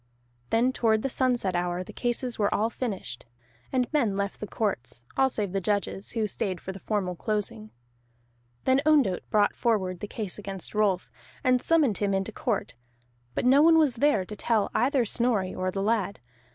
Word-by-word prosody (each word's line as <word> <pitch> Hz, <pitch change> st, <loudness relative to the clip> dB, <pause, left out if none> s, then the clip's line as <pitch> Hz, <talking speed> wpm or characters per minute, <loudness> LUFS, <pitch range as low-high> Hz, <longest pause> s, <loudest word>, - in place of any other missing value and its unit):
Then 245 Hz, +3 st, +2 dB
toward 220 Hz, -3 st, +2 dB
the 270 Hz, -, -1 dB
sunset 245 Hz, -9 st, +1 dB
hour 175 Hz, +1 st, -1 dB
the -, -, -11 dB
cases 245 Hz, 0 st, -2 dB
were 205 Hz, -1 st, +2 dB
all 220 Hz, +2 st, +1 dB
finished, 195 Hz, -, -5 dB, 0.4 s
and 255 Hz, -2 st, +2 dB
men 230 Hz, -10 st, +2 dB
left 200 Hz, 0 st, -2 dB
the 210 Hz, -, -5 dB
courts, 125 Hz, -, -3 dB
all 265 Hz, 0 st, +4 dB
save 210 Hz, -6 st, -2 dB
the 195 Hz, 0 st, -1 dB
judges, 200 Hz, 0 st, -1 dB
who 225 Hz, -2 st, 0 dB
stayed 190 Hz, -3 st, -3 dB
for 190 Hz, -, -6 dB
the 190 Hz, -, -9 dB
formal 190 Hz, -3 st, -2 dB
closing. 215 Hz, +3 st, -3 dB, 0.9 s
Then 260 Hz, +1 st, +3 dB
Ondott 285 Hz, -12 st, +2 dB
brought 205 Hz, -1 st, +3 dB
forward 190 Hz, -7 st, 0 dB
the 210 Hz, -, -5 dB
case 210 Hz, -2 st, -4 dB
against 195 Hz, -3 st, -7 dB
Rolf, 205 Hz, -4 st, +1 dB, 0.3 s
and 255 Hz, -2 st, +3 dB
summoned 300 Hz, -11 st, +2 dB
him 200 Hz, -1 st, +1 dB
into 195 Hz, 0 st, -2 dB
court, -, -, -2 dB, 0.6 s
but -, -, -1 dB
no 270 Hz, +3 st, +6 dB
one 325 Hz, +1 st, +6 dB
was 295 Hz, -7 st, +3 dB
there 230 Hz, -8 st, +3 dB
to 210 Hz, -, -8 dB
tell 215 Hz, -1 st, +1 dB
either 255 Hz, +1 st, +2 dB
Snorri 220 Hz, -4 st, 0 dB
or 185 Hz, 0 st, -2 dB
the 195 Hz, +1 st, -2 dB
lad. 205 Hz, -3 st, 0 dB
215 Hz, 180 wpm, -27 LUFS, 195-245 Hz, 0.9 s, no